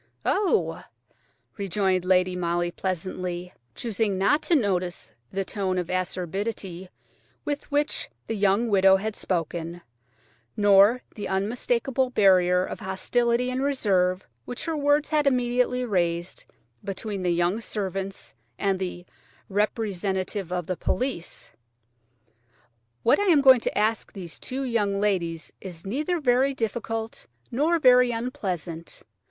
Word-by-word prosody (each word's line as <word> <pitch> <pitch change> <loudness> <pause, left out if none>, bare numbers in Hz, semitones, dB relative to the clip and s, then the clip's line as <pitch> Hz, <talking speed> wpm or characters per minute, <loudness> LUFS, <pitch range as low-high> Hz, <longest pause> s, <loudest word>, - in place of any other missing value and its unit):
"Oh!" 400 -2 +1 0.7
rejoined 190 -2 0
Lady 185 0 +3
Molly 175 0 0
pleasantly–choosing 185 - -3
not 200 +11 +3
to 345 - +2
notice 185 - -1 0.2
the 195 0 -2
tone 190 -2 -2
of 180 -1 -2
acerbity 185 +1 -3 0.6
with 290 0 -3
which 290 +1 0 0.2
the - - -3
young 205 +3 +2
widow 195 -2 +5
had 210 +2 -2
spoken, 170 -1 -3 0.8
nor 205 +4 +5
the 210 - -5
unmistakable 240 +6 0
barrier 185 -5 +4
of - - -6
hostility 235 +6 0
and 255 +1 -2
reserve 195 -9 +1 0.2
which 245 - -6
her 325 -1 -1
words 290 0 +2
had 300 -2 +2
immediately 250 -1 +1
raised 175 -4 -1 0.4
between 200 0 -4
the 180 - 0
young 175 +5 +1
servants 195 -3 -4 0.2
and 195 -2 0
the 180 -1 -5 0.4
"representative 200 -2 -1
of 180 -2 -2
the 185 0 -3 2.3
police"–"what - - +5
I 410 - +1
am 330 -7 +5
going 260 -2 +8
to - - -3
ask 215 +2 +1
these 180 -5 -8
two 265 +2 -3
young 210 -6 0
ladies 170 -6 -1
is 175 -3 -9
neither 300 - -1
very 265 0 +2
difficult 225 -1 -3 0.2
nor 305 +8 +2
very 250 -4 +6
unpleasant. 185 -9 -4
200 Hz, 120 wpm, -26 LUFS, 185-245 Hz, 2.3 s, going